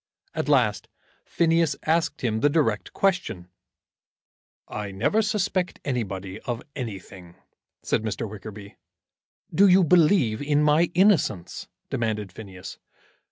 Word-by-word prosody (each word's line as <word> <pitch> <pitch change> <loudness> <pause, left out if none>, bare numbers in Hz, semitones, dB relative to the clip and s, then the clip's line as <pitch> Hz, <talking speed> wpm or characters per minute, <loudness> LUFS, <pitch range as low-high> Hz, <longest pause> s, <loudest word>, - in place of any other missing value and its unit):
At - - -3
last - - +2 0.4
Phineas 165 -3 +2
asked 160 +1 0
him 110 -3 0
the 145 - +3
direct 140 -9 0
question. 180 - -1 1.2
"I 105 -1 -5
never 100 - +1
suspect 200 -4 -1
anybody 100 -8 -3
of 120 -2 -5
anything," 95 -7 -8 0.5
said - - 0
Mr. 110 +1 -3
Wickerby. 105 0 -10 0.8
"Do 200 +2 +6
you 185 0 +6
believe 155 - +3
in 145 +1 +2
my 150 +3 +3
innocence?" 155 - +2 0.2
demanded 110 -4 -2
Phineas. 95 -2 -10
125 Hz, 115 wpm, -25 LUFS, 100-170 Hz, 1.2 s, Do